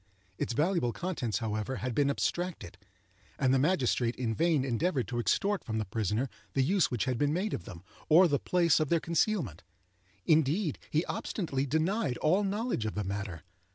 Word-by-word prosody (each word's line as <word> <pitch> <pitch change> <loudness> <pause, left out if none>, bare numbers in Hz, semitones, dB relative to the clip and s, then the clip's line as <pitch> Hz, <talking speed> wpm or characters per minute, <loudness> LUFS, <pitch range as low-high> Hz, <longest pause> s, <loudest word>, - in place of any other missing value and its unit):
Its - - -1
valuable 155 -2 +1
contents, 140 - -2
however, 110 +2 -2
had 125 -1 -3
been 140 +3 +2
abstracted, 175 - -2 0.6
and 130 -3 +2
the 135 - +4
magistrate 130 -6 +1
in 115 -3 -1
vain 160 0 +2
endeavored 135 +2 0
to 120 0 -3
extort 200 - +1
from 110 -1 -3
the 110 - -1
prisoner 110 +5 -1 0.3
the 135 - +2
use 185 +6 +2
which 120 -5 -1
had 125 -2 -1
been 145 0 +2
made 190 +6 -1
of - - -4
them, 90 -6 -10 0.3
or 175 +4 +7
the 145 -4 +1
place 170 -4 +3
of 155 -2 0
their 170 - +3
concealment. 165 - 0 0.6
Indeed, 155 +2 +2
he 155 +3 +1
obstinately 140 -8 -2
denied 160 - 0
all 185 +7 +2
knowledge 205 - -1
of 110 - -4
the 105 - -1
matter. 100 -4 -5
140 Hz, 180 wpm, -30 LUFS, 115-170 Hz, 0.6 s, or